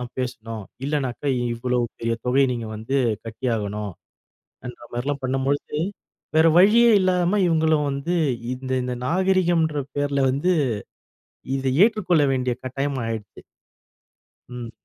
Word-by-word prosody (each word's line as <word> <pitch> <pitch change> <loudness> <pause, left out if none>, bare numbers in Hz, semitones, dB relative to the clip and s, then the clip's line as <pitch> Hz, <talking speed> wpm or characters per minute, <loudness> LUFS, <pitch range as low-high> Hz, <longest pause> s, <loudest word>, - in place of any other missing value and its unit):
தான் 125 -1 -7
பேசணும். 115 -4 -5 0.2
இல்லனாக்கா 140 -1 -2 0.3
இவ்வளோ 125 +1 -1 0.2
பெரிய 115 0 -1
தொகைய 135 +2 +4
நீங்க 115 -2 -4
வந்து 115 +6 -2 0.3
கட்டியாகணும்” 105 -4 -3 0.7
என்ற 125 - -8
மாரிலாம் 140 +3 -2
பண்ணம்பொழுது, 135 +3 -1 0.6
வேற 160 +1 +6
வழியே 225 +5 +6
இல்லாம 185 +1 +2
இவுங்களும் 160 -2 +2
வந்து 165 +6 -1 0.4
இந்த 130 0 -7
இந்த 125 0 -3
நாகரிகம்ன்ற 175 -3 +2 0.2
பேர்ல 140 -1 +1
வந்து, 175 +7 +1 1.0
இதை 135 -1 -1
ஏற்றுக்கொள்ள 180 -9 +2
வேண்டிய 125 -2 0
கட்டாயம் 135 +1 -2
ஆயிடுச்சு. 110 -2 -6 1.1
ம். 125 -2 -7
135 Hz, 115 wpm, -23 LUFS, 125-160 Hz, 1.1 s, வேற